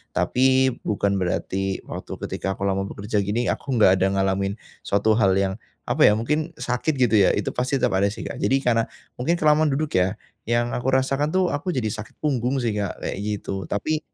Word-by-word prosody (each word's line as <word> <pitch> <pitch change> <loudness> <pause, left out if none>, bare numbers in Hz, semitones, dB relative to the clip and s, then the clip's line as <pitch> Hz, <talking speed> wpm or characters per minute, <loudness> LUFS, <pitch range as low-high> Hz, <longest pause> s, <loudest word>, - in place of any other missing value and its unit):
Tapi 130 +1 +3
bukan 100 -1 0
berarti, 95 +1 -2
waktu - - -8
ketika 95 0 -3
aku - - -6
lama 95 0 0
bekerja 105 +2 -2
begini, 105 +5 0
aku 135 -2 -3
enggak 95 -4 +5
ada 95 - +3
ngalamin 95 +1 0 0.2
suatu 100 +2 +1
hal 95 -3 +4
yang, 95 0 +1 0.3
apa - - +4
ya, 105 - +5
mungkin 150 +8 -1
sakit 125 +5 -1
gitu 120 -5 +3
ya, 95 - +4
itu 100 - -1
pasti 125 +2 -1
tetap - - +3
ada 100 - +3
sih 100 - -5
Kak. - - -6
Jadi 135 +1 +1
karena, 115 -2 +2 0.3
mungkin 160 +8 +1
kelamaan 155 -1 +3
duduk 150 +1 -1
ya, 90 +1 +1 0.3
yang 120 +1 +1
aku 120 +2 -3
rasakan 135 +2 +1
tuh 185 -1 +2
aku 175 +4 -2
jadi 110 -5 -1
sakit 110 +1 -7
punggung 130 -3 0
sih 115 - +1
Kak, 100 -2 -2
kayak - - -3
gitu. 100 -3 -4
Tapi 150 - -1
115 Hz, 200 wpm, -23 LUFS, 100-135 Hz, 0.3 s, enggak